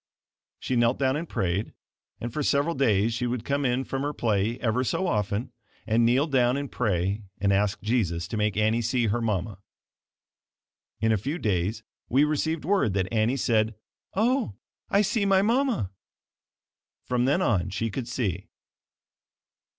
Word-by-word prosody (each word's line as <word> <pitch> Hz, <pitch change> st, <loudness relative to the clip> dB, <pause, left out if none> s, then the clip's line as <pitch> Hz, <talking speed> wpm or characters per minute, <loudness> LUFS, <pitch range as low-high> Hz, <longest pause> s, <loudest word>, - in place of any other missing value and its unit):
She 130 Hz, -, -2 dB
knelt 120 Hz, +1 st, +3 dB
down 135 Hz, -1 st, +1 dB
and 160 Hz, +2 st, -4 dB
prayed, 95 Hz, +3 st, -1 dB, 0.5 s
and 115 Hz, +1 st, -5 dB
for 150 Hz, -, -2 dB
several 145 Hz, +3 st, +2 dB
days 115 Hz, -5 st, +2 dB
she 120 Hz, +1 st, -1 dB
would 120 Hz, -1 st, -3 dB
come 140 Hz, +1 st, 0 dB
in 125 Hz, 0 st, +1 dB
from 135 Hz, 0 st, -3 dB
her 145 Hz, +1 st, -2 dB
play 110 Hz, -2 st, 0 dB
ever 125 Hz, +1 st, 0 dB
so 185 Hz, +8 st, -1 dB
often 105 Hz, -, -1 dB, 0.3 s
and 115 Hz, +2 st, +2 dB
kneel 125 Hz, +5 st, +4 dB
down 130 Hz, -4 st, +2 dB
and 140 Hz, -1 st, -4 dB
pray 100 Hz, -2 st, 0 dB, 0.2 s
and 100 Hz, 0 st, +2 dB
ask 100 Hz, +1 st, +1 dB
Jesus 90 Hz, -8 st, 0 dB
to -, -, -4 dB
make 105 Hz, -1 st, 0 dB
Annie 110 Hz, +2 st, +2 dB
see 120 Hz, +1 st, +1 dB
her 110 Hz, +2 st, 0 dB
mama. 100 Hz, -3 st, -2 dB, 1.4 s
In 110 Hz, 0 st, +3 dB
a 110 Hz, -, +3 dB
few 140 Hz, -, -3 dB
days 105 Hz, -, -1 dB, 0.3 s
we 135 Hz, +4 st, +4 dB
received 155 Hz, +1 st, 0 dB
word 190 Hz, -, +2 dB
that 95 Hz, +2 st, -1 dB
Annie 115 Hz, +4 st, +2 dB
said 110 Hz, -3 st, +1 dB, 0.4 s
"Oh, 235 Hz, -, +1 dB, 0.3 s
I 200 Hz, +1 st, +4 dB
see 210 Hz, +1 st, 0 dB
my 195 Hz, -1 st, +4 dB
mama!" 235 Hz, -, +1 dB, 1.1 s
From 125 Hz, -1 st, +1 dB
then 145 Hz, +8 st, +2 dB
on 95 Hz, -, +1 dB
she 115 Hz, +4 st, -2 dB
could 125 Hz, +2 st, -4 dB
see. 100 Hz, -7 st, -2 dB
120 Hz, 165 wpm, -26 LUFS, 105-140 Hz, 1.4 s, kneel